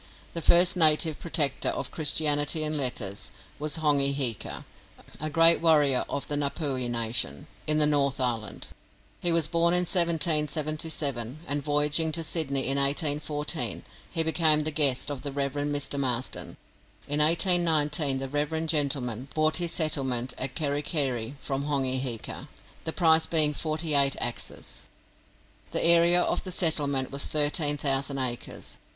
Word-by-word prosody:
The 165 - -4
first 175 +3 +4
native 160 -2 +5
protector 150 -5 0
of 140 - -4
Christianity 150 0 0
and 155 0 -2
letters 125 -8 -3 0.3
was 150 +1 -3
Hongi 145 -3 +2
Hika, 125 -7 -3 0.5
a 155 - -3
great 165 +2 +5
warrior 150 -6 +3
of 140 - -4
the - - -3
Ngapuhi 140 -3 -2
nation, 115 - -1 0.2
in 155 0 +3
the 150 - +5
North 140 -2 +1
Island. 115 -5 -3 0.5
He 175 - 0
was 165 -2 +2
born 170 +1 +2
in 180 - +3
1777, 155 - -1
and 145 0 -2
voyaging 150 +2 +1
to 165 - -1
Sydney 150 -4 0
in 135 +1 0
1814, 150 +2 -1 0.3
he 165 -2 0
became 160 -1 +3
the 155 - -1
guest 145 -2 +2
of 140 -3 -6
the 140 - -5
Rev. 140 -1 -3
Mr. 145 -1 -2
Marsden. 130 -2 -3 0.5
In 145 +1 0
1819 155 -3 +2
the 135 0 -5
rev. 150 +3 -2
gentleman 135 -6 -1
bought 155 0 +2
his 175 -1 0
settlement 130 -6 -1
at 130 0 -2
Kerikeri 145 -4 -2
from 140 0 -4
Hongi 135 -3 -1
Hika, 120 -4 -6 0.4
the 160 - -1
price 160 -2 +3
being 155 -3 +2
forty 155 +1 -2
eight 140 -1 +4
axes. 120 - -4 0.8
The - - -1
area 170 +1 +5
of - - -1
the 185 - -7
settlement 145 -6 +1
was 140 0 -2
thirteen 145 0 +1
thousand 140 -1 -1
acres. 125 -2 -4
145 Hz, 145 wpm, -26 LUFS, 135-160 Hz, 0.8 s, native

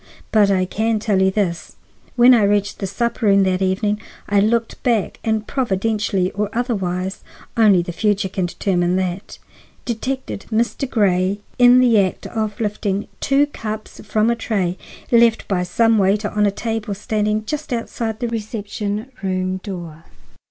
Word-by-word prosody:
But 210 -2 +4
I 185 -2 +2
can 220 +4 0
tell 205 -2 +1
you 190 - +4
this: 180 -5 -2 0.4
When 245 +1 +7
I 235 - +5
reached 205 0 +1
the 195 - -2
supper 235 +3 -1
room 200 -1 +5
door 190 - +2
that 185 - -4
evening 205 +3 0 0.3
I 205 0 +3
looked 225 +2 0
back 230 -5 0
and, 220 -1 0
providentially 205 -6 0
or 205 +1 -2
otherwise—only 195 -2 0
the 175 - -5
future 205 +2 0
can 185 -1 -2
determine 175 0 0
that—detected 210 +6 -5
Mr. 235 +4 0
Grey 195 -2 +1 0.2
in 245 0 +7
the 235 -4 +5
act 190 -2 -1
of 215 0 -3
lifting 210 -2 -2
two 275 +1 +3
cups 220 -6 -7
from 220 +2 +1
a - - +1
tray 195 -6 -1 0.4
left 235 -1 +4
by 190 -3 0
some 225 +5 +2
waiter 200 +2 +2
on 210 0 +2
a - - +1
table 220 -1 -3
standing 215 0 -1
just 300 +4 -4
outside 230 -2 -3
the 240 - 0
reception 215 0 -4
room 185 -1 -1
door. 175 -5 -8
210 Hz, 155 wpm, -20 LUFS, 190-225 Hz, 0.4 s, When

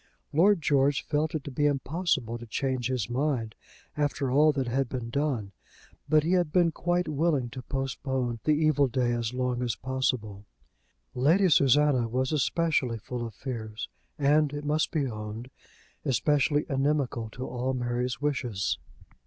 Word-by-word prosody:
Lord 175 +2 +4
George 140 -1 +2
felt 155 +2 0
it 150 - -2
to 140 - -7
be 145 +3 +2
impossible 140 -4 -1
to 120 - -10
change 130 +1 -1
his 125 -6 -1
mind 125 -4 -1 0.4
after 145 -3 -1
all 150 +3 +5
that 135 -2 -1
had 130 +1 0
been 120 -3 -5
done; 130 -8 -1 0.6
but 155 0 +4
he 165 - 0
had 175 -4 +2
been 175 -1 +3
quite 175 +2 0
willing 145 -5 0
to 130 - -7
postpone 130 -2 -2
the 155 - +3
evil 150 -2 +3
day 125 -1 0
as 120 -1 -1
long 125 -1 -1
as 120 -2 -1
possible. 120 -6 -2 0.7
Lady 165 +9 +3
Susanna 140 -3 +4
was 130 +4 -1
especially 150 -5 +1
full 120 +3 -5
of 115 -3 -7
fears, 110 -4 -5 0.3
and, 145 +1 +3
it 145 0 -5
must 150 +1 +1
be 155 -4 0
owned, 110 +1 -6 0.5
especially 145 +2 +2
inimical 135 -5 0
to 125 +4 -6
all 130 +1 -2
Mary's 125 0 -2
wishes. 125 -9 -1
135 Hz, 155 wpm, -28 LUFS, 120-150 Hz, 0.7 s, all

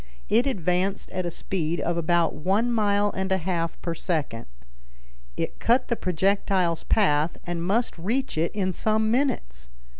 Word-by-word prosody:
It 235 +5 +3
advanced 185 - -1
at 185 -1 -2
a - - -1
speed 170 -1 -2
of 170 - -1
about 170 0 +2
one 200 +9 +1
mile 205 -2 +2
and 190 0 -2
a 190 - +3
half 170 -2 -2
per 170 - -1
second. 155 -9 -3 0.9
It - - -3
cut 245 +3 +2
the 235 - +2
projectile's 185 -2 +1
path 160 -6 +2
and 175 -1 -3
must 205 +1 0
reach 230 +10 -1
it 160 +2 0
in 185 -3 -1
some 215 +3 +1
minutes. 65 - -1
185 Hz, 155 wpm, -25 LUFS, 170-210 Hz, 0.9 s, It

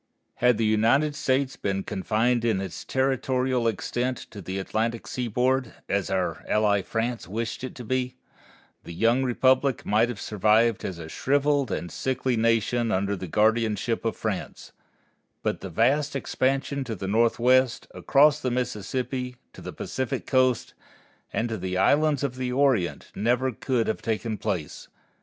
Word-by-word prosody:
Had 125 -2 +3
the 115 - +1
United 115 +8 +3
States 135 -1 0
been 95 -1 -2
confined 115 +5 0
in 110 -5 +1
its 95 -3 -6
territorial 130 -2 0
extent 120 +2 -1
to 105 - -8
the 95 +2 -5
Atlantic 110 +4 -2
seaboard, 125 +1 -1
as 100 -1 -1
our 95 -1 -1
ally 105 -2 +3
France 115 +3 -3
wished 115 +6 -4
it 130 - -6
to 125 - -8
be, 125 +2 -1 0.7
the 85 - -9
young 115 +7 +3
republic 130 +1 +2
might 110 +3 +3
have 120 -5 -5
survived 110 +2 +2
as 90 - -4
a 80 -1 -8
shriveled 140 - +1
and 85 -1 -3
sickly 130 +2 -1
nation 115 +1 +1
under 100 +1 0
the 95 -1 -6
guardianship 110 +3 +1
of 115 - -1
France; 105 -4 -4 0.7
but - - -1
the - - -6
vast 140 +6 +1
expansion 135 +1 -1
to 115 -3 -5
the 95 0 -5
Northwest, 120 +4 +3
across 145 +1 +4
the 130 - -1
Mississippi, 125 +2 -3 0.2
to - - -12
the - - -6
Pacific 130 -2 -4
Coast, 130 -3 +2 0.6
and 115 - -1
to 110 -3 -4
the 90 0 -3
Islands 145 +4 +3
of 130 -2 -2
the 125 -1 -2
Orient 130 -9 +1
never 125 +4 +1
could 120 0 -1
have 110 - -2
taken 110 0 -2
place. 90 -9 -4
120 Hz, 155 wpm, -26 LUFS, 110-130 Hz, 0.7 s, across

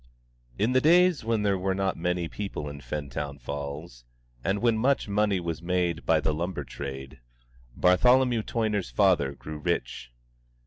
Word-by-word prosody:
In 115 - +1
the 130 0 +3
days 175 0 +4
when 110 -1 0
there 100 -2 +1
were 95 0 0
not 95 0 0
many 90 0 -1
people 95 -6 -5
in 70 -1 -8
Fentown 70 +1 -5
Falls, 70 0 -6 0.4
and 95 - +1
when 115 +1 +2
much 130 +4 +1
money 105 -1 +1
was 85 -2 -4
made 90 -1 -1
by 80 -1 +4
the 80 0 0
lumber 85 +4 -3
trade, 65 -2 -7 0.6
Bartholomew 125 +6 +4
Toyner's 110 -3 -1
father 90 -9 +2
grew 75 +3 -8
rich. 60 -7 -3
90 Hz, 150 wpm, -27 LUFS, 75-105 Hz, 0.6 s, days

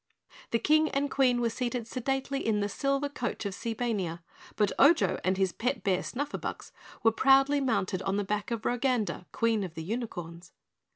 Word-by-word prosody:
The 230 - +2
King 310 +6 +3
and 280 0 -1
Queen 250 -3 +3
were 230 -1 +1
seated 245 0 -2
sedately 270 +3 -2
in 215 -2 +1
the 205 - 0
Silver 275 +6 0
Coach 245 -6 -4
of 200 - -2
Seebania, 210 -7 -3 0.3
but 210 -2 +2
Ojo 315 +4 +5
and 185 +1 +1
his 190 -1 +2
pet 250 +9 -2
bear 190 -2 +1
Snufferbux 285 +3 -5 0.3
were 225 - +6
proudly 275 +4 +4
mounted 195 -8 0
on 195 +1 -1
the 205 - 0
back 205 +1 -2
of 230 -2 -3
Roganda, 245 -6 0
Queen 225 -3 +1
of 180 -3 -7
the 160 - -5
Unicorns. 175 -5 -5
230 Hz, 175 wpm, -29 LUFS, 200-270 Hz, 0.3 s, were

